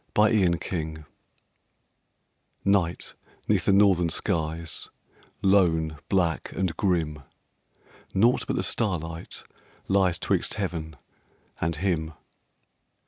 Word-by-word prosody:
THE 105 -5 +4
CAMPER 80 -3 -4 1.6
Night 95 -4 +1 0.3
'neath - - +2
the - - +4
northern 95 -4 +4
skies, 80 -2 -1 0.5
lone, 80 -6 +3
black, 85 -5 +1
and 95 -4 -1
grim: 80 -6 0 0.9
Naught 115 +6 +3
but - - -1
the - - 0
starlight 85 -7 -2 0.4
lies 95 -3 +3
'twixt - - -1
heaven, 80 -2 -3 0.6
and 85 0 0
him. 80 -2 -1
85 Hz, 90 wpm, -26 LUFS, 80-95 Hz, 1.6 s, THE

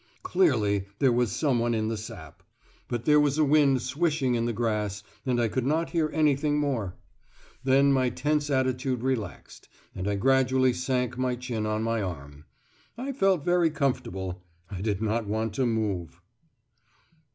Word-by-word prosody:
Clearly 110 - +2
there 135 +1 +3
was 120 -3 +1
someone 120 -3 +1
in 110 -1 -1
the 115 - -1
sap. 80 -8 -9 0.5
But 120 -1 -4
there 150 0 +5
was 145 -1 +2
a 155 - +4
wind 140 -3 +3
swishing 140 -1 0
in 115 -1 0
the 120 - 0
grass, 105 -3 -2 0.2
and 125 -1 +1
I 120 - +2
could 125 +3 -2
not 155 +5 0
hear 160 -3 +1
anything 150 -1 +2
more. 130 -11 -1 0.7
Then 135 +1 +4
my 130 -2 +2
tense 150 +4 -1
attitude 130 -2 0
relaxed, 125 -8 -4 0.2
and 95 +2 -4
I 105 - 0
gradually 130 +2 +3
sank 125 0 -1
my 130 -1 0
chin 120 -3 -3
on 110 0 -1
my 115 -1 0
arm. 75 -6 -7 0.5
I 265 +3 -3
felt 195 - +1
very 175 -2 +3
comfortable. 115 - -2 0.3
I 95 -2 -5
did 105 0 -1
not 110 0 -1
want 110 +1 -2
to 130 +2 +1
move.... 100 - -2
125 Hz, 165 wpm, -27 LUFS, 110-140 Hz, 0.7 s, there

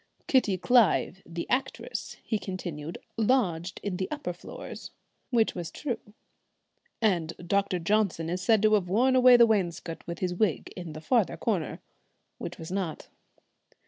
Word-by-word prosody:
"Kitty 220 -8 +3
Clive, 205 -3 +3
the 170 0 -5
actress," 270 - -2
he 220 - -1
continued, 170 -5 -5 0.2
"lodged 195 -7 +1
in 195 -3 -2
the 190 - -2
upper 295 -12 -3
floors," - - -9 0.4
which 230 -3 +2
was 175 -2 -5
true 270 -6 -3 1.0
"and 170 -6 +2
Dr. 195 +1 0
Johnson 175 -2 +1
is 180 +2 -2
said 220 +2 +3
to 215 0 +5
have 190 -4 +2
worn 250 +7 +3
away 255 -1 +8
the 235 - +8
wainscot 180 -6 -1
with 170 0 -4
his 180 0 -1
wig 175 - 0
in 175 -4 -7
the 155 - -8
further 230 +2 +2
corner," 185 - -2 0.6
which - - -6
was 160 +1 -8
not. 185 -5 -3
190 Hz, 150 wpm, -28 LUFS, 170-225 Hz, 1.0 s, away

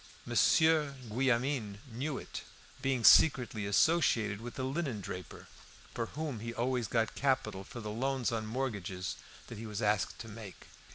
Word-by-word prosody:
Monsieur 160 -3 +4
Guillaumin 125 -2 0
knew 135 +5 -3
it, - - -7 0.4
being 135 -3 0
secretly 120 -7 +6
associated 110 -4 +3
with 120 +1 -7
the 130 - -3
linendraper, 130 - -4 0.5
from 115 - -2
whom 150 -6 -4
he 115 +1 -5
always 125 -1 0
got 115 +2 0
capital 130 -8 0
for 120 +4 -9
the 105 -1 -5
loans 130 +2 0
on 110 -2 -2
mortgages 100 - -3 0.3
that 115 - -9
he 115 - -6
was 105 -1 -4
asked 105 -3 +1
to 115 - -8
make. 110 -3 -10
115 Hz, 150 wpm, -32 LUFS, 105-135 Hz, 0.5 s, secretly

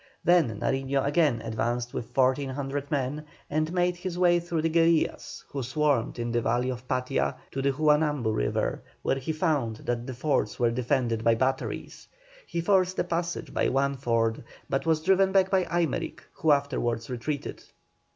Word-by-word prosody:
Then 160 -12 +3
Nariño 135 0 0
again 145 -5 +2
advanced 120 +2 -2
with 115 - -6
1,400 135 +1 0
men, 145 +1 -1 0.3
and 155 +2 0
made 180 0 +1
his 180 -1 -5
way 175 -1 +4
through 170 -2 -2
the 165 - +2
guerillas, 165 -1 +1
who 140 - -4
swarmed 130 -1 0
in 120 0 -2
the 120 0 +1
valley 120 +3 0
of 125 0 -8
Patia, 130 +1 0 0.2
to 135 - -3
the 140 +1 +2
Juanambu 150 -5 +2
river, - - -1 0.2
where 135 - +1
he 135 +4 -3
found 155 -8 0
that 120 0 -2
the 130 - -5
fords 125 -5 0
were 120 -1 +2
defended 120 -2 0
by 115 0 +4
batteries. 130 +3 -2 0.4
He 170 - -2
forced 185 0 +2
a - - +2
passage 170 0 -3
by - - +1
one 140 +1 +1
ford, 115 -4 0 0.2
but 135 +4 -1
was 160 -1 +2
driven 190 +1 +4
back 190 -1 +3
by 190 -2 +3
Aymerich, 170 -5 -2
who 160 - -1
afterwards 125 -5 0
retreated. 135 +4 -4
140 Hz, 170 wpm, -27 LUFS, 120-165 Hz, 0.4 s, way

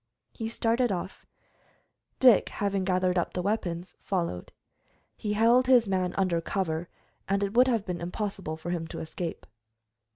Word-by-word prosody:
He 225 -2 -5
started 230 +1 +1
off. 185 0 -5 0.9
Dick, 250 -6 +6
having 200 -2 -1
gathered 185 -1 +1
up - - -2
the 180 - 0
weapons, 180 -4 -2
followed. 170 - -2 0.6
He 210 -1 -3
held 235 +4 +4
his 245 -4 +5
man 185 -2 0
under 180 -4 +1
cover, 170 -2 -2 0.4
and 195 +1 +1
it 200 0 -2
would 250 +2 +5
have 230 -5 +1
been 180 -4 -4
impossible 180 -2 -4
for 165 +2 -5
him 165 -2 -2
to - - -7
escape. 165 +1 -5
190 Hz, 155 wpm, -28 LUFS, 175-220 Hz, 0.9 s, Dick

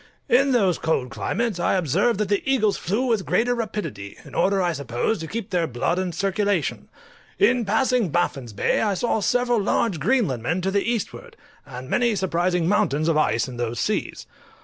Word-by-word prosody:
In 275 +2 +4
those 195 -9 +2
cold 135 -6 -1
climates 230 -6 -2
I 175 - +1
observed 190 - +1
that 210 - 0
the 205 +1 +1
eagles 225 -7 +2
flew 210 +9 -1
with 225 -6 +1
greater 245 +5 +1
rapidity, 210 - -5
in - - -13
order, 195 0 +2
I 175 -2 +1
suppose, 140 - -2
to 160 - -5
keep 220 +2 -5
their 175 -3 +1
blood 155 +8 -1
in 185 -1 -2
circulation. 200 +4 -1 0.5
In 250 - +3
passing 225 0 +1
Baffin's 140 -7 -1
Bay 100 - 0
I 205 -3 +1
saw 225 +3 0
several 245 +3 +1
large 195 -3 0
Greenlandmen 175 - 0
to 190 - 0
the 200 0 +2
eastward, 240 - -4 0.3
and 130 -1 -8
many 235 - +1
surprising 180 -2 0
mountains 155 -6 +1
of 165 - +2
ice 135 -6 +1
in 125 -2 -8
those 120 -1 -3
seas. - - -2
195 Hz, 180 wpm, -23 LUFS, 160-230 Hz, 0.5 s, In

